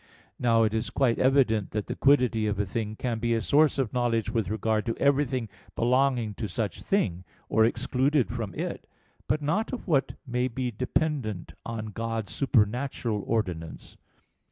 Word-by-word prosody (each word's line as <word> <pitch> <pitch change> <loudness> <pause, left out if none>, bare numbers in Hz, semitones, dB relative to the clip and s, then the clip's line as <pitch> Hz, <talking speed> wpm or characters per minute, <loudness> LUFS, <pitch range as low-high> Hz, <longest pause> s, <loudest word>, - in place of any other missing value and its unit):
Now 115 -2 +4
it 110 -1 +1
is 110 +1 -1
quite 125 -4 +1
evident 125 -6 +3
that 105 -1 -1
the - - -4
quiddity 125 -6 +3
of 105 -1 -1
a 105 - 0
thing 105 +2 -3
can 115 -1 -2
be 120 0 +1
a - - +1
source 150 +6 +3
of 130 -5 -1
knowledge 120 -3 0
with 110 -6 -1
regard 110 0 0
to 115 - -1
everything 135 -4 +1 0.3
belonging 125 -2 +2
to 110 - -1
such 100 -1 -3
thing, 95 - 0 0.3
or 110 - +4
excluded 130 +2 +1
from 115 -7 -4
it; - - -5 0.4
but 150 - 0
not 195 +10 0
of 255 - -6
what 140 -6 +1
may 125 -1 0
be 125 0 -3
dependent 125 - -2
on 110 -2 -4
God's 115 -1 -3
supernatural 120 -2 0
ordinance. 90 -8 -3
115 Hz, 165 wpm, -27 LUFS, 110-130 Hz, 0.4 s, Now